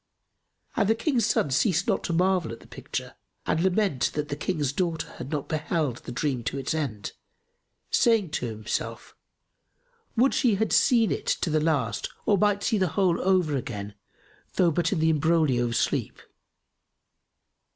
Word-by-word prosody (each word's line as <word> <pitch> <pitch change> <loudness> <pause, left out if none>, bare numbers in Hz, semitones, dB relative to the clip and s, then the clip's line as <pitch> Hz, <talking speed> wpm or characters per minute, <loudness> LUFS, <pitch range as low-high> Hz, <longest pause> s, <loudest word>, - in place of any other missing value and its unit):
And 200 - +2
the 225 - +4
King's 235 -2 +1
son 145 - +1
ceased 180 - +2
not - - +1
to - - -2
marvel 180 -5 +2
at 115 - -8
the - - -16
picture - - -6 0.3
and 160 - +1
lament 190 -6 +1
that 150 0 -2
the 145 - -2
King's 150 -3 -1
daughter 165 -1 -1
had 130 - -6
not 150 -2 -3
beheld 155 -4 -1
the - - -9
dream 130 -1 -1
to 130 - -2
its 135 - -2
end, 130 -11 -3 0.8
saying 220 -9 +3
in 125 - -2
himself, 110 -1 -5 1.0
"Would 260 +4 +4
she 240 -6 +3
had 220 +3 0
seen 235 -5 +4
it - - -3
to 165 - 0
the 155 0 +2
last 140 -8 0 0.2
or 205 - +4
might 205 +1 +2
see 220 -4 +1
the 185 - +2
whole 185 -4 +2
over 180 -5 +2
again, 105 -5 -5 0.6
though 175 -3 +4
but 165 +1 0
in 195 - 0
the 160 0 +3
imbroglio 155 -5 +2
of 120 -1 -2
sleep!" - - -1
160 Hz, 170 wpm, -26 LUFS, 140-190 Hz, 1.0 s, the